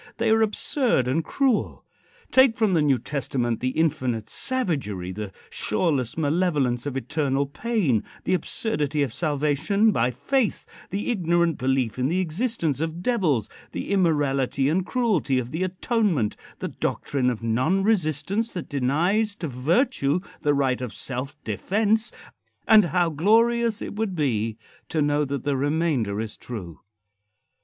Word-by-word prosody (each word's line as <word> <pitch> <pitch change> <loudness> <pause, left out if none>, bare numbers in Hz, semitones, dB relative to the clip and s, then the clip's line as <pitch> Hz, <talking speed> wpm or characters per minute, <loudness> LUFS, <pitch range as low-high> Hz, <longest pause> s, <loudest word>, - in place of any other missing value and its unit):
They - - +1
are 225 0 +4
absurd 220 - +1
and 150 +6 +1
cruel. 260 - 0 0.5
Take 260 -3 +6
from 215 -4 +2
the 165 - +3
New 140 -3 +3
Testament 125 -2 -2
the 130 - 0
infinite 130 -8 -1
savagery, 140 - -2
the 105 +1 -6 0.2
shoreless 130 +1 0
malevolence 145 -6 +1
of 135 -2 -3
eternal 140 +1 0
pain, 145 - 0 0.2
the - - 0
absurdity 150 -6 -1
of 130 -5 -3
salvation 155 - +1
by 120 - +2
faith, 255 - -1 0.2
the 205 +6 -2
ignorant 170 -5 +1
belief 130 -3 0
in 125 - +2
the 175 +5 0
existence 175 - -1
of 165 +2 -3
devils, 170 - +1 0.3
the - - -4
immorality 145 -7 +2
and 180 +4 0
cruelty 210 - +1
of 125 -1 -2
the 160 - -3
atonement, 185 - 0 0.2
the - - -4
doctrine 130 -3 -1
of 115 -2 -4
non 130 +13 +1
resistance 195 - 0
that 180 - -5
denies 170 - +1
to 180 -6 -4
virtue 150 - +1 0.2
the 145 -2 +2
right 130 -2 +1
of 125 -3 -4
self 135 +2 -5
defence, 215 - 0 0.6
and 215 -3 +7
how 175 0 +1
glorious 225 +7 +2
it - - -5
would 210 -3 -2
be 115 -8 0 0.3
to 160 - -1
know 145 0 +2
that 140 -2 -4
the 145 -1 0
remainder 140 -7 0
is 110 -1 -5
true! 95 -10 -8
150 Hz, 145 wpm, -24 LUFS, 130-195 Hz, 0.6 s, and